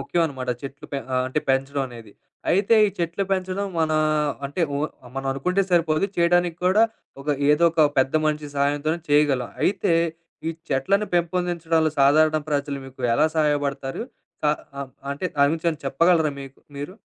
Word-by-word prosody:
ముఖ్యమనమాట. 140 -7 -1
చెట్లు 140 0 -8
పె 140 - -1 0.3
అంటే 130 - -1
పెంచడం 135 +1 +1
అనేది. 115 -4 -12 0.4
అయితే 205 +5 +3
ఈ - - +1
చెట్లు 170 +3 -1
పెంచడం 190 +1 -1
మన 160 -1 +1 0.5
అంటే 145 +6 -5 0.2
ఒ - - -1 0.4
మనం 135 0 -4
అనుకుంటే 180 +9 0
సరిపోదు. 165 0 +2
చేయడానిక్కూడా 175 +3 +3 0.4
ఒక 145 - -9 0.2
ఏదో 150 +3 +4
ఒక 165 - +1 0.2
పెద్ద 130 +2 +2
మనిషి 150 -1 -1
సహాయంతోనే 145 +4 0
చేయగలం. 145 -4 +3
అయితే, 195 -3 +2 0.5
ఈ - - 0 0.2
చెట్లను 195 +10 +1
పెంపొందించడంలో 170 -2 +1
సాధారణ 155 +3 +5
ప్రజలు 140 -1 -1
మీకు 135 0 -14
ఎలా 150 +5 +4
సహాయపడతారు? 145 -1 0 0.5
అ - - +5 0.3
అం 140 -1 -5 0.2
అంటే 140 +6 -5
దాని 140 0 +5
గురించి 165 +1 -3
ఏవన్నా 155 -3 -4
చెప్పగలరా 160 +3 +3
మీకు 135 0 -11 0.2
మీరు? 145 +6 -6
155 Hz, 145 wpm, -23 LUFS, 140-175 Hz, 0.5 s, సాధారణ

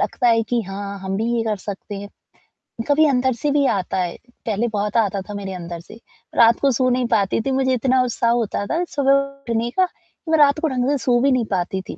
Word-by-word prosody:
लगता 245 - +1
है 230 -1 +4
कि, 235 +2 -1
हाँ, 200 0 -6
हम 190 0 -3
भी 220 - -1
ये 230 - +1
कर 215 -2 -1
सकते 205 +1 -7
हैं, 200 +1 -7 0.8
कभी 300 +2 +4
अंदर 260 -2 +2
से 285 +5 -2
भी 285 -1 +2
आता 190 -6 -1
है, 180 -2 -1 0.3
पहले 220 +1 0
बहुत 205 +1 -1
आता 200 -3 +1
था - - -5
मेरे 195 -1 -5
अंदर 170 -1 -6
से, 170 +6 -13 0.4
रात 230 -1 +5
को 275 -1 +3
सो 255 +1 +1
नहीं 250 0 +1
पाती 200 0 +1
थी, 270 - -2
मुझे 260 0 +1
इतना 255 +1 +2
उत्साह 235 -1 0
होता 230 -4 -1
था 330 - -1
सुबह 275 -1 +1
उठने 275 -4 -1
का, 370 +7 +3
कि 330 -2 -12
मैं 320 - +4
रात 290 0 +5
को 320 - 0
ढंग 255 -1 0
से 290 - +2
सो 245 -1 +3
भी 275 +1 +3
नहीं 250 -3 +2
पाती 190 0 -1
थी, - - -6
235 Hz, 240 wpm, -21 LUFS, 200-265 Hz, 0.8 s, रात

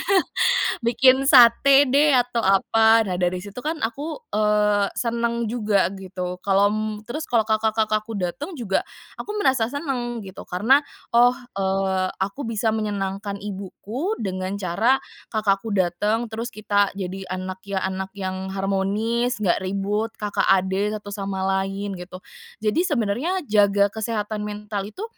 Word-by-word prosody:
iya, - - -3 0.8
"bikin 255 +3 +4
sate 270 +1 +7
deh, 285 +2 +4
atau 245 -1 +1
apa." 225 +2 +4
Nah, 185 -3 -3
dari 180 0 0
situ 205 +4 -8
kan, 310 +5 -2
aku, 295 - -4
eee, 210 -1 +2
senang 235 -1 -1
juga 210 -6 +1
gitu, 180 -1 -5
kalau 200 +2 +3
m 215 - -1 0.2
terus, 305 +8 -5
kalau 235 -2 +2
kakak-kakakku 220 0 0
dateng 205 - -4
juga, 220 -8 -1 0.3
aku 420 +1 -5
merasa 265 - +2
senang, 245 -5 -3
gitu. 190 -1 -10
Karena 220 +10 +4 0.3
"Oh, 245 +1 +5 0.2
eee, 190 -1 0
aku 200 +7 -4
bisa 220 0 0
menyenangkan 200 -2 -3
ibuku 205 - -5
dengan 185 -2 -3
cara 200 +7 +2 0.3
kakakku 210 -1 0
dateng, 210 +6 0
terus 230 +2 -4
kita 205 -1 +2
jadi 190 0 -5
anak 185 0 -5
ya 195 -1 -2
anak 190 +1 -4
yang 190 -1 -4
harmonis, 205 +5 -1
nggak 180 - +2
ribut, 200 +4 -2
kakak 210 -1 -1
adik, 195 +2 +2
satu 205 -1 -8
sama 195 -1 -3 0.2
lain" 195 0 -4
gitu. 185 +1 -10 0.4
Jadi, 320 +12 +1
sebenarnya 290 - -1
jaga 205 -4 +3
kesehatan 215 -1 -3
mental 210 -1 -5
itu, 375 - -8
210 Hz, 140 wpm, -23 LUFS, 195-235 Hz, 0.8 s, sate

